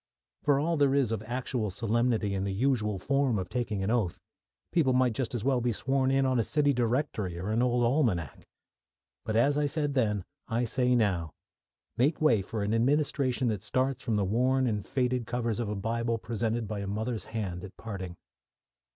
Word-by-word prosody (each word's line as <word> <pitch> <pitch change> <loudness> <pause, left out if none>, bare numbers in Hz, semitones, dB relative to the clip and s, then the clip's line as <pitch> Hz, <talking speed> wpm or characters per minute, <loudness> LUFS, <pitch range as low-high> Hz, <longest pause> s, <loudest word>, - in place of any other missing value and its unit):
For 145 -2 +3
all 165 +3 0
there 140 -2 +3
is 135 -6 +2
of 110 -2 -1
actual 125 -3 -2
solemnity 110 +1 0
in 95 -1 -1
the 100 - -1
usual 105 -3 +1
form 135 +3 +1
of 90 -2 -3
taking 110 -5 -2
an 100 - 0
oath, 110 -8 0 0.5
people 155 -7 +3
might 125 -2 +3
just 130 0 -2
as 110 - -3
well 130 -1 +2
be 120 0 +1
sworn 130 +4 0
in 135 0 +3
on 130 -2 +2
a - - +3
city 145 +3 +2
directory 120 - -1
or 95 +4 -4
an 115 +2 +2
old 125 -1 +2
almanac. 115 - 0 0.8
But, 110 - -2
as 140 +6 +3
I 145 - +2
said 145 -1 -1
then, 105 -7 +1 0.2
I 120 +1 0
say 125 +2 +2
now 95 -8 +1 0.7
make 140 +6 +2
way 125 -10 +4
for 105 +2 -4
an 105 +2 0
administration 130 +1 +1
that 105 -4 -2
starts 130 +4 -1
from 115 - -1
the 100 -2 +1
worn 130 +6 +2
and 105 -4 -1
faded 125 -1 -1
covers 120 -3 -1
of 115 -3 -2
a 105 - -2
Bible 115 +3 -1
presented 115 0 -2
by 105 0 -4
a 100 - -4
mother's 110 +1 -3
hand 95 -6 -4
at 100 - -10
parting. 95 -5 -6
115 Hz, 195 wpm, -29 LUFS, 105-130 Hz, 0.8 s, way